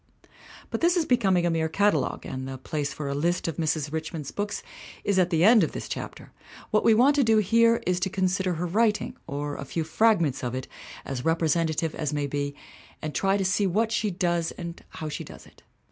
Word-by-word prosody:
But - - -2
this 345 +2 +3
is 335 - +2
becoming 195 -9 +2
a 175 - +2
mere 160 -1 0
catalogue, 205 +5 +1
and 130 0 -5
the 135 0 -5
place 145 +2 -3
for 150 - -5
a 140 - -1
list 170 +6 0
of 165 - -3
Mrs. 155 -2 -1
Richmond's 160 -2 -4
books 205 0 -3 0.4
is 200 -2 +2
at 180 -1 +3
the 165 -2 +2
end 220 +2 +7
of - - -2
this - - -5
chapter. - - -7 0.4
What 215 - +3
we 225 - +5
want 260 +6 +5
to 280 - +5
do 225 -2 +4
here 230 +3 +4
is 180 0 +1
to 190 +1 0
con 190 0 +1
sider 185 0 0
her 170 +2 -2
writing, 210 +4 +1
or 145 +1 -3
a - - -5
few 160 +4 -3
fragments 165 - +2
of 125 0 -2
it 130 - -5 0.4
as 135 -2 -4
repre 165 +2 +1
sentative 160 -1 0
as 150 -2 -3
may 145 -1 0
be, 145 0 -3 0.4
and 155 -1 -5
try 195 +1 +2
to 195 - -1
see 190 +2 +2
what 220 +5 +1
she 225 -2 0
does 175 -2 0
and 170 0 -8
how 155 - -6
she 150 - -4
does - - -12
it. - - -20
170 Hz, 225 wpm, -26 LUFS, 150-205 Hz, 0.4 s, end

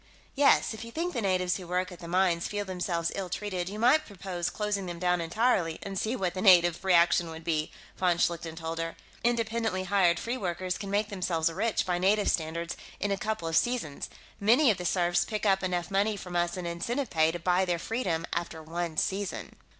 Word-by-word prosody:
"Yes, 280 -4 +4
if 220 0 -7
you 230 - -8
think 340 +6 -2
the 240 - -1
natives 185 -3 +1
who 185 -3 -9
work 180 +1 -1
at 175 - -10
the 170 - -8
mines 175 -1 +2
feel 205 -1 -3
themselves 175 -3 -2
ill 195 -2 -4
treated, 185 -1 -3
you 205 - -6
might 255 +8 +4
propose 185 -3 -4
closing 205 -3 -2
them 175 -1 -5
down 180 0 +1
entirely 170 -2 +1
and 195 -1 -5
see 220 +6 -1
what 185 -7 -1
the 185 - -4
native 175 -3 +5
reaction 175 -2 +4
would 160 0 -8
be," 155 -2 -1 0.3
von 180 -2 +2
Schlichten 170 -2 -1
told 165 0 -5
her. 165 0 -3 0.3
"Independently 230 -4 0
hired 185 -3 +3
free 240 +2 -3
workers 180 -2 -2
can 200 - -5
make 205 +2 0
themselves 170 -5 0
rich, 220 +5 0
by 180 -1 0
native 200 +3 +3
standards, 165 +1 -2 0.2
in 205 - -1
a - - +2
couple 215 -4 -3
of 165 - -1
seasons; 235 - 0 0.3
many 235 +6 +5
of 195 - -3
the 180 - -4
serfs 175 0 +2
pick 215 +2 -4
up 195 -1 +3
enough 180 -2 -2
money 205 +2 +1
from 180 -2 -7
us 175 +1 0
in 180 - -4
incentive 230 +10 -2
pay 160 -1 +3
to 175 - -4
buy 180 +2 +2
their 175 -2 0
freedom 170 -4 -2
after 170 -2 -3
one 165 0 -4
season." 195 +3 -2
185 Hz, 210 wpm, -29 LUFS, 170-205 Hz, 0.3 s, native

